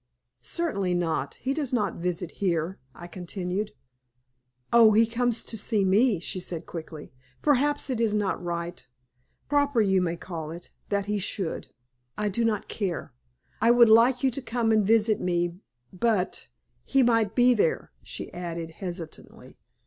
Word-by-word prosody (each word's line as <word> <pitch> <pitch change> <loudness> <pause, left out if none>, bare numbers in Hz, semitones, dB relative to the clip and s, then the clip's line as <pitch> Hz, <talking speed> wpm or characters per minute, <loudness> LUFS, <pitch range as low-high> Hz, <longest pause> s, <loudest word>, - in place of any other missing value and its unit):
"Certainly 200 - -1
not. 170 -2 -1
He 270 - -2
does 285 -4 -2
not 210 -7 0
visit 180 0 -2
here," 175 -1 -1 0.2
I 175 - -10
continued. 180 +3 -4 1.0
"Oh, 230 -2 +7
he 225 +2 +5
comes 240 +1 0
to - - -7
see 215 -1 +1
me," 205 +1 +3
she 185 +2 -4
said, 175 -2 -4
quickly. 155 -4 -8 0.3
"Perhaps 290 0 +2
it 250 -4 -2
is 215 -2 +2
not 205 -3 -1
right 170 -2 -4 0.6
proper 285 -3 +2
you 190 -3 +3 0.2
call 165 -3 -6
it 170 +2 -9 0.2
that 200 -1 0
he 210 0 -1
should. 190 -2 -3 0.5
I 210 0 0
do 230 +4 -1
not 220 -3 0
care. 190 -6 -4 0.5
I 230 - +4
would 240 -1 +7
like 240 +4 +5
you 265 - +3
to 275 - -5
come 235 -2 0
and 215 -1 +4
visit 220 -1 +3
me 175 0 -1 0.3
but 190 - 0 0.4
he 270 -1 +3
might 230 -3 +2
be 250 0 +6
there," 205 -8 0
she - - -7
added, 170 -2 -5
hesitatingly. 175 -2 -9
205 Hz, 155 wpm, -26 LUFS, 175-235 Hz, 1.0 s, Oh